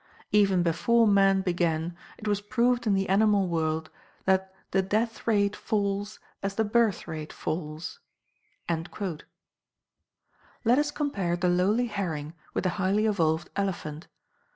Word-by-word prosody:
Even 195 -4 +4
before 230 +7 +3
man 195 -1 +4
began 175 -2 0 0.2
it 215 - -7
was 205 -1 +1
proved 240 +2 +1
in 200 - +4
the 195 0 0
animal 200 0 +3
world 160 -1 -1 0.3
that 190 0 +2 0.2
THE 190 - +3
DEATH 220 +5 -1
RATE 205 -2 +2
FALLS 205 -1 -1 0.2
AS 195 0 -3
THE 220 - +2
BIRTH 220 -2 +1
RATE 155 -1 -5
FALLS." 155 0 -5 0.7
Let 170 0 -3 1.6
us 295 0 +1
compare 245 - -1
the 180 0 +1
lowly 195 +7 +2
herring 170 -9 -3 0.2
with - - 0
the 185 - +1
highly 200 +3 +2
evolved 170 -6 +1
elephant. 175 -6 -3
195 Hz, 130 wpm, -27 LUFS, 170-210 Hz, 1.6 s, Even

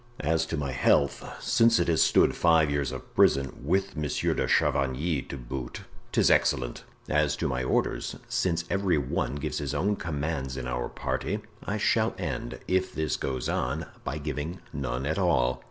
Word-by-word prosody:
"As 80 +2 +1
to - - -3
my 70 -2 -2
health, 70 +2 +2 0.2
since 115 0 +4
it 85 - +1
has 80 -2 +3
stood - - +4
five 80 -3 +4
years 70 -3 0
of 65 - -8
prison, 70 -1 +3
with 95 +6 0
Monsieur 75 -2 0
de - - 0
Chavigny 70 +3 +1
to 70 - -5
boot, 60 0 -6 0.3
'tis - - +4
excellent! - - +1 0.2
As - - +2
to - - -1
my 65 0 -1
orders, 65 - 0
since 85 -2 0
every 95 -2 +1
one 65 -1 -1
gives 70 - -3
his 70 -2 -3
own 105 +3 +1
commands 75 -5 -3
in 65 - -4
our 60 -1 -2
party, - - -2 0.2
I - - -2
shall - - +2
end, - - -4
if 95 0 +1
this 80 -3 -1
goes 65 -2 -3
on, 65 +6 -1 0.2
by 70 - -3
giving 75 +3 -4
none 65 +3 -2
at 80 +7 -1
all." 65 -9 +2
75 Hz, 175 wpm, -28 LUFS, 65-85 Hz, 0.3 s, since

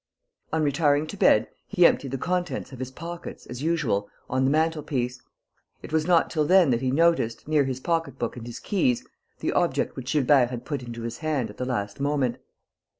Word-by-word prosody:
On 160 -1 +1
retiring 145 0 +2
to 155 - -7
bed, - - +4 0.2
he 180 -4 +4
emptied 140 - +3
the 135 - -3
contents 180 +3 -2
of 130 - -10
his 130 -1 -4
pockets, 170 +6 -8
as 125 +1 -7
usual, 145 -11 0 0.2
on 130 +1 +2
the - - +3
mantel 160 +1 +1
piece. 125 -3 -3 0.6
It - - -9
was 160 0 +1
not 175 -2 +4
till 155 -2 +1
then 180 -2 +5
that 120 - +1
he 130 - 0
noticed, 150 -5 +2
near 150 -2 +3
his 130 -1 -3
pocketbook 140 -6 -2
and 120 -1 -8
his 120 - -7
keys, 145 - 0 0.4
the - - 0
object - - +1
which 130 0 -5
Gilbert 135 -3 +4
had 125 -1 -6
put 145 -4 -3
into 120 -1 -7
his 115 0 -5
hand 145 -9 -1
at - - -17
the 125 - -2
last 105 -4 -3
moment. 140 -4 0
140 Hz, 205 wpm, -26 LUFS, 125-160 Hz, 0.6 s, then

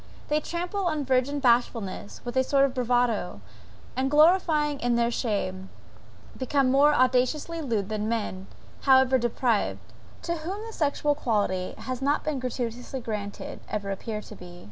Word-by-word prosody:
They 300 +1 +2
trample 355 +4 -3
on 300 -4 -1
virgin 260 +2 +1
bashfulness 235 -6 0
with 240 0 -5
a 260 - +4
sort 275 +1 +3
of 270 - -2
bravado, 245 - 0 0.6
and 260 +1 0
glorying 300 -2 +4
in 240 0 +1
their 235 0 +2
shame, 190 -5 -2 0.7
become 260 0 +1
more 285 +3 +5
audaciously 255 +6 +1
lewd 225 -8 -1
than 215 0 -2
men, 200 -4 -3 0.3
however 265 -1 +5
depraved, 235 -2 -1 0.3
to 340 0 -2
whom 380 +7 -5
the 450 - -8
sexual 295 -2 +1
quality 205 -9 -1
has 255 0 -5
not 285 +2 +1
been 300 -3 -2
gratuitously 245 0 -4
granted, 210 -3 -5
ever 200 -2 -3
appear 210 +2 -4
to 210 - -11
be. 175 -2 -12
255 Hz, 150 wpm, -26 LUFS, 220-290 Hz, 0.7 s, more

